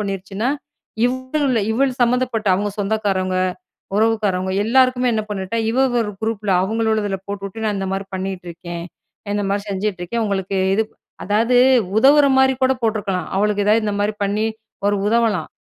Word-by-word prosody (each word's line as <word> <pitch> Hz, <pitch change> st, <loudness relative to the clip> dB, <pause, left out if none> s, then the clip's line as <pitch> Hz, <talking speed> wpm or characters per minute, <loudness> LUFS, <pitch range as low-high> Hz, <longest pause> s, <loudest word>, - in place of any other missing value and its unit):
பண்ணிருச்சுனா, 195 Hz, +2 st, -3 dB, 0.6 s
இவள் 260 Hz, +3 st, -1 dB, 0.2 s
இவள் 265 Hz, +3 st, +2 dB
சம்மந்தப்பட்ட, 240 Hz, -2 st, 0 dB
அவங்க 205 Hz, +2 st, -1 dB
சொந்தக்காரங்க, 195 Hz, -3 st, 0 dB, 0.6 s
உறவுக்காரவங்க, 205 Hz, -4 st, +1 dB
எல்லாருக்குமே 255 Hz, +1 st, +3 dB
என்ன 215 Hz, -1 st, -1 dB
பண்ணிட்டா, 195 Hz, +2 st, -3 dB
இவள் 255 Hz, 0 st, +2 dB
ஒரு 210 Hz, -2 st, -4 dB
குரூப்பில 215 Hz, -3 st, -1 dB
அவங்கள 220 Hz, +3 st, 0 dB
உள்ளதில 205 Hz, -3 st, -1 dB
போட்டுட்டு. 200 Hz, +2 st, -5 dB
நான் 210 Hz, -1 st, 0 dB
இந்த 195 Hz, 0 st, -3 dB
மாதிரி 195 Hz, 0 st, -3 dB
பண்ணிட்டுருக்கேன். 175 Hz, -2 st, -6 dB, 0.5 s
இந்த 205 Hz, -, 0 dB
மாதிரி 200 Hz, +1 st, -1 dB
செஞ்சுட்ருக்கேன், 195 Hz, +2 st, -2 dB
உங்களுக்கு 195 Hz, -1 st, -2 dB, 0.2 s
இது. 220 Hz, -, +2 dB, 0.4 s
அதாவது 225 Hz, +5 st, +2 dB, 0.4 s
உதவுற 280 Hz, +4 st, +6 dB
மாதிரி 265 Hz, 0 st, +4 dB
கூட 260 Hz, 0 st, +4 dB
போட்ருக்கலாம். 205 Hz, -6 st, -1 dB
அவளுக்கு 205 Hz, 0 st, +1 dB
எதாவது 215 Hz, +1 st, +3 dB
இந்த 205 Hz, -, -1 dB
மாதிரி 210 Hz, +1 st, 0 dB
பண்ணி, 210 Hz, +2 st, 0 dB, 0.4 s
ஒரு 205 Hz, 0 st, +2 dB
உதவலாம். 225 Hz, -3 st, +1 dB
210 Hz, 140 wpm, -20 LUFS, 195-230 Hz, 0.6 s, உதவுற